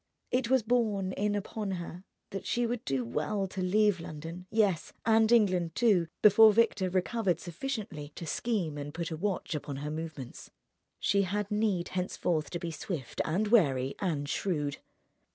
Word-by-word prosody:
It 250 -1 +1
was 260 -3 +4
borne 215 -5 +1
in 205 +2 0
upon 205 0 -3
her 175 0 -6 0.3
that 195 - -5
she 240 0 +1
would 235 0 -2
do 135 -3 -1
well 155 - -1
to 190 0 -5
leave 205 +1 +3
London, 165 +3 -8
yes, 205 -6 +1
and 220 0 +4
England, 185 -8 +3
too, 200 -8 +3 0.2
before 215 +1 +8
Victor 210 -4 +2
recovered 185 -1 0
sufficiently 185 - -5
to 170 - -6
scheme 170 -5 -1
and 145 +1 -6
put 170 -1 -3
a - - -2
watch 190 +2 -2
upon 145 -2 -4
her 145 +2 -4
movements. 155 -5 -7 0.5
She 200 0 +2
had 205 +2 -2
need 210 -5 0
henceforth 175 -4 -1
to 175 - -3
be 170 -1 -4
swift 155 - -4
and 200 +7 0
wary 140 - +3
and 155 -7 -1
shrewd.... 150 -3 -1
185 Hz, 165 wpm, -30 LUFS, 160-210 Hz, 0.5 s, before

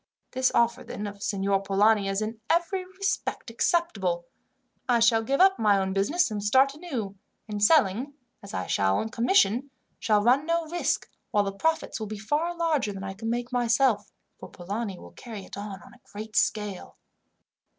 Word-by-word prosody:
This 260 0 +1
offer, 235 +1 +2
then, 210 - -6
of 200 -1 -7
Signor 195 -1 0
Polani 200 +1 +3
is 195 +2 -1
in 220 +1 -5
every 345 +3 +1
respect 380 - -3
acceptable. 200 - 0 0.6
I 240 -1 +4
shall 225 0 +4
give 270 +5 -1
up 385 +1 +5
my 210 -2 +4
own 190 0 -1
business 270 - +1
and 210 -1 -3
start 265 +6 +4
anew, 255 - -5 0.3
and 210 -1 -4
selling, 260 +1 +3 0.3
as 200 - -10
I 95 - -3
shall, 95 -1 +1
on 220 - -2
commission, 245 - +2 0.3
shall 210 -2 +2
run 260 +6 +3
no 335 0 +1
risk, 345 +2 -1 0.2
while 205 - +2
the 195 - -2
profits 320 +4 -1
will 215 - -4
be 215 +1 -6
far 300 +11 -1
larger 315 -10 +1
than 195 -1 -7
I 195 0 -5
could 225 +3 -5 0.2
myself 245 -1 +3
make, - - -38
for - - -10
Polani 200 +2 -5
will - - -13
carry 220 -5 -9
it - - -10
on 200 -1 -7
on - - -16
a 250 - -20
great 215 +1 -8
scale. 210 -3 -1
220 Hz, 180 wpm, -27 LUFS, 200-280 Hz, 0.6 s, up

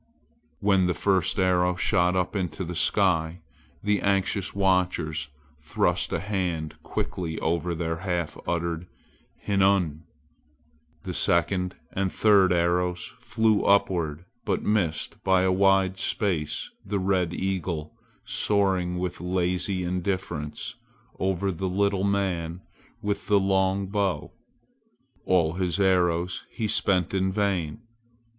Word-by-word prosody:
When 95 -3 +3
the 90 - 0
first 95 -4 +1
arrow 90 -1 +2
shot 90 -1 +2
up 90 +2 -1
into 90 -3 -2
the 90 0 -5
sky 85 -2 +1 0.4
the 105 0 +1
anxious 100 0 +1
watchers 90 -6 +1 0.3
thrust 75 - 0
a - - 0
hand 90 -6 -3
quickly 80 -3 -3
over 85 +1 -1
their 80 0 -2
half 90 -3 -2
uttered 85 0 -2 0.6
"hinnu!" 95 -6 +2 1.0
The - - -4
second 90 +1 +1 0.2
and 95 0 0
the - - -10
third 100 -4 +5
arrows 90 +1 0
flew 110 -2 +2
upward 85 -5 +1 0.2
but - - -1
missed 95 -8 -1
by 95 -1 +3
a 95 - +3
wide 95 0 +3
space 90 -10 -1
the 100 +1 -2
red 95 -3 +1
eagle 85 -4 -3 0.3
soaring 95 -4 +1
with 90 0 -3
lazy 90 +1 0
indifference 90 -4 -3 0.5
over 95 +1 0
the 95 +2 -3
little 100 +1 +1
man 95 -4 -1 0.4
with 100 0 -2
the 100 -1 +4
long 95 0 +1
bow. 95 -5 -1 1.0
All 85 -4 +3
his 90 +1 -1
arrows 90 -2 +1
he 110 - -3
spent 95 -4 +1
in 95 0 +1
vain. 100 -1 -1
90 Hz, 120 wpm, -26 LUFS, 85-95 Hz, 1.0 s, third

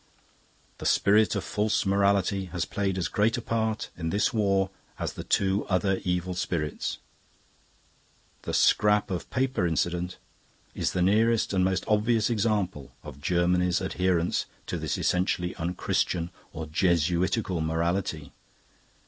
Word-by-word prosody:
"The - - -2
spirit 105 +2 +4
of - - -1
False 105 0 0
Morality 100 0 +2
has 90 -2 -3
played 95 -2 -2
as 90 - 0
great 110 +3 +1
a - - -3
part 110 -1 -1
in 80 -1 -3
this 100 +4 +1
war 100 -3 +1 0.3
as - - -3
the - - -7
two 95 0 +1
other 95 0 +1
evil 90 0 -1
spirits. 85 -4 -2 1.4
The - - -5
Scrap 105 -1 +3
of 90 - -4
Paper 130 -8 0
incident 85 +3 -1 0.6
is - - -1
the 90 - +1
nearest 110 +3 +3
and 95 -1 +2
most 95 0 +1
obvious 110 +1 +2
example 100 -9 -1
of 70 - -10
Germany's 90 +2 +2
adherence 90 -2 0 0.2
to - - -3
this - - -2
essentially 90 -1 0
unchristian 85 0 -1 0.2
or 80 0 -6
Jesuitical 85 +3 +1
morality. 80 0 -1
95 Hz, 130 wpm, -27 LUFS, 85-105 Hz, 1.4 s, spirit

